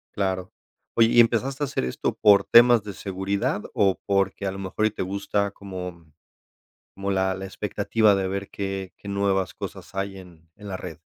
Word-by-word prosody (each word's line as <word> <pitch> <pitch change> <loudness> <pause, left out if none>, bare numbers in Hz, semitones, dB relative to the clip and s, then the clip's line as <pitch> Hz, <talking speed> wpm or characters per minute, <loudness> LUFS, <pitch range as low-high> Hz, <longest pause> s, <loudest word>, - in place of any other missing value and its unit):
Claro. 95 -2 -1 0.5
Oye, 115 -1 +6
¿y 120 - +4
empezaste 125 +5 +3
a - - +3
hacer 135 - -2
esto 65 - -2
por 100 -2 +6
temas 120 -1 +6
de 105 -1 -7
seguridad 100 +2 -2
o 95 -2 +2
porque 100 0 0
a - - -1
lo 95 - -7
mejor 95 +3 -1
y - - -3
te 105 - -3
gusta 100 +1 -1
como 90 -5 -8 0.8
como 100 0 -3
la 95 -1 +1
la 95 +1 -6
expectativa 105 +2 +1
de 95 -1 0
ver 100 +1 -4
qué 95 -1 -4
qué 100 - -10
nuevas 100 -1 0
cosas - - -8
hay 95 0 -3
en 85 -3 -15
en 105 0 -10
la 95 - -3
red? 90 -2 -8
100 Hz, 190 wpm, -25 LUFS, 95-100 Hz, 0.8 s, Oye